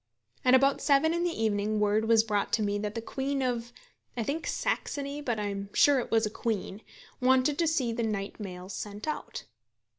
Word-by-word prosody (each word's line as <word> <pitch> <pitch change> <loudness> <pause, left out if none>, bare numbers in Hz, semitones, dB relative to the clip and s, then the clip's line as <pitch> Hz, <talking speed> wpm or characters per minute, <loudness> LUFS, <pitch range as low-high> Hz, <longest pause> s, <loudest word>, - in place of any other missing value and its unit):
At 255 0 +6
about 275 +1 +3
seven 295 +3 +3
in 340 0 0
the 350 - +2
evening 210 0 0
word 210 +1 +2
was 225 -1 +5
brought 210 -2 -1
to 220 - +2
me 205 0 0
that 210 +1 -4
the 230 - -4
Queen 270 +2 -2
of, 240 -2 -2 0.5
I 235 - 0
think 295 +8 -3
Saxony, 285 - -2
but 240 -6 -2
I - - -2
am 200 0 -5
sure 285 -2 +5
it 245 - -4
was 225 0 +3
a 210 - -3
Queen, 215 -3 -3 0.4
wanted 260 +3 +3
to 335 - +3
see 260 -7 +1
the 235 - -2
night 210 -2 -3
mails 185 -1 -7
sent 205 +6 -6
out. 305 - -4
230 Hz, 205 wpm, -29 LUFS, 210-275 Hz, 0.5 s, At